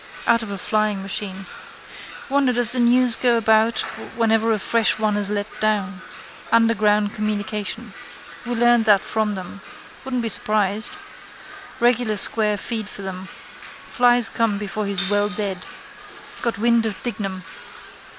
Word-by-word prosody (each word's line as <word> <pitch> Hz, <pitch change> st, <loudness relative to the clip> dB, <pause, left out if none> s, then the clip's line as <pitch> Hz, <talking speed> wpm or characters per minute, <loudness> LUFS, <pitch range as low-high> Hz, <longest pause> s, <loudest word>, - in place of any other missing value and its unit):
Out 230 Hz, -, +3 dB
of 220 Hz, -, -6 dB
a 200 Hz, -, -4 dB
flying 215 Hz, -1 st, -1 dB
machine. 195 Hz, -1 st, -4 dB, 0.8 s
Wonder 275 Hz, -1 st, +2 dB
does 240 Hz, -1 st, +1 dB
the 250 Hz, -, 0 dB
news 245 Hz, 0 st, +4 dB
go 240 Hz, -1 st, +2 dB
about 220 Hz, 0 st, +3 dB, 0.3 s
whenever 225 Hz, -1 st, +2 dB
a 220 Hz, -, +2 dB
fresh 225 Hz, +2 st, +2 dB
one 215 Hz, -1 st, 0 dB
is 205 Hz, -1 st, 0 dB
let 205 Hz, -1 st, -1 dB
down. 200 Hz, -3 st, -1 dB, 0.5 s
Underground 215 Hz, -2 st, +3 dB
communication. 210 Hz, -1 st, -3 dB, 0.5 s
We 245 Hz, 0 st, -3 dB
learned 240 Hz, -1 st, +4 dB
that 205 Hz, -3 st, +5 dB
from 215 Hz, -2 st, -1 dB
them. 190 Hz, +1 st, -8 dB, 0.4 s
Wouldn't 255 Hz, -2 st, -2 dB
be 225 Hz, -, -1 dB
surprised. 215 Hz, -1 st, +1 dB, 0.9 s
Regular 240 Hz, -2 st, +2 dB
square 210 Hz, +1 st, +1 dB
feed 220 Hz, 0 st, -4 dB
for 200 Hz, -, -8 dB
them. 190 Hz, 0 st, -6 dB, 0.6 s
Flies 245 Hz, -2 st, +4 dB
come 225 Hz, -3 st, 0 dB
before 205 Hz, +1 st, -4 dB
he's 195 Hz, -1 st, +1 dB
well 205 Hz, +1 st, +2 dB
dead. 200 Hz, -3 st, -4 dB, 0.7 s
Got 235 Hz, -3 st, -1 dB
wind 230 Hz, +1 st, +2 dB
of 210 Hz, -, -4 dB
Dignam. 195 Hz, -6 st, -4 dB
215 Hz, 140 wpm, -21 LUFS, 205-230 Hz, 0.9 s, that